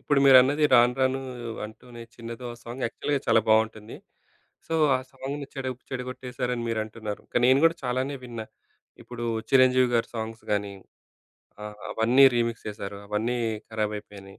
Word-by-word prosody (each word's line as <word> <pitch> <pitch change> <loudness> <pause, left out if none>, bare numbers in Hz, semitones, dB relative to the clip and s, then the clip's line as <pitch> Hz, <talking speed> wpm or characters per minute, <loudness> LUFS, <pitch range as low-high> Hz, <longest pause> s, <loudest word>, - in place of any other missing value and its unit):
ఇప్పుడు 145 - +1
మీరన్నది 135 +3 +6
రాను 120 0 +5
రాను 130 0 +2 0.5
అంటూనే 120 +2 -12
చిన్నదో. 115 +1 -8
ఆ - - -15
సాంగ్ 120 +3 -7
యాక్చల్‌గా 140 +4 -2
చాలా 115 - +5
బావుంటుంది. 110 0 +1 0.7
సో, 165 - -3 0.2
ఆ - - -3
సాంగ్‌ని 140 +2 -6
చెడ 135 -2 -4 0.2
చెడగొట్టేసారని 125 -1 -4
మీరంటున్నారు. 110 -1 -4
కానీ 120 - +2
నేను 135 +1 +5
గూడా 165 +1 +4
చాలానే 130 +3 -1
విన్న. 120 -2 -7 0.6
ఇప్పుడు 120 -1 -7 0.2
'చిరంజీవి' 130 -1 +5
గారి 115 - +1
సాంగ్స్ 110 0 -5
గానీ, 100 -1 -1 0.9
ఆహ్, 105 0 -7
అవన్నీ 120 +5 +5
రీమిక్స్ 115 -1 -1
చేసారు. 100 -1 -6
అవన్నీ 110 +4 -1 0.3
ఖరాబైపోయినాయి. 105 -2 -5
120 Hz, 140 wpm, -26 LUFS, 110-130 Hz, 0.9 s, మీరన్నది